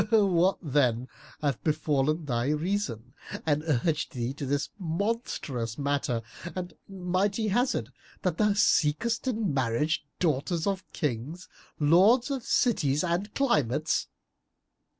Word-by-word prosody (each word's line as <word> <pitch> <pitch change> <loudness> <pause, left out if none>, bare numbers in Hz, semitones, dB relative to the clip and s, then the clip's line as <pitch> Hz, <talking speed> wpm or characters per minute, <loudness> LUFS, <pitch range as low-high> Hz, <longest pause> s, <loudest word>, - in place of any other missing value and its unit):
What 195 -4 +4
then 130 -5 +1 0.3
hath 140 -5 0
befallen 155 0 +1
thy 120 -2 0
reason 150 - -2 0.3
and 150 -1 +1 0.2
urged 160 -2 0
thee 120 +1 -2
to 140 -1 -5
this 145 +1 0
monstrous 165 - -2
matter 140 -5 -1 0.3
and 180 -1 -5 0.2
mighty 195 +3 0
hazard, 205 - +1 0.3
that 180 -3 -1
thou 210 -1 +4
seekest 205 - +2
in 220 - 0
marriage 135 +5 0
daughters 160 +1 0
of 190 -2 -2
Kings, 150 +5 -3 0.3
lords 195 - +5
of 270 -2 -1
cities 150 - +2
and 180 +4 -1
climates? 155 - +1
160 Hz, 115 wpm, -28 LUFS, 140-195 Hz, 0.3 s, lords